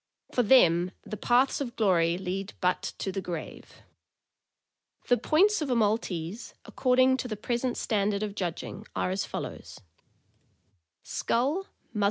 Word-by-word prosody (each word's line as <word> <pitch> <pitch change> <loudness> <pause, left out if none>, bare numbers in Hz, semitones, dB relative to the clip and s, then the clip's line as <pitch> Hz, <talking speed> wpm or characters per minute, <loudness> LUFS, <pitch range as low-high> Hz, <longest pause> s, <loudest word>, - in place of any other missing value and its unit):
For 245 - +2
them 185 -7 +5
uthe 215 - -6
paths 255 +4 +3
of 240 -4 -4
glory 175 -5 +2
lead 190 +1 -4
but 180 0 +1 0.2
to 190 - -3
the 195 - -3
grave." 170 -3 -7 1.3
The 245 - +5
points 385 +9 +3
of 295 - -2
a 250 - +2
Maltese, 210 -3 -1
according 255 0 +3
to 255 - -4
the 215 -3 -4
present 240 +3 -2
stand 210 -2 +1
ard 200 - -2
of 210 -1 -3
judging, 190 +2 -5
are 180 - 0
as 190 +1 -1
follows: - - -7 1.3
Value. 285 +11 0
215 Hz, 140 wpm, -28 LUFS, 185-250 Hz, 1.3 s, them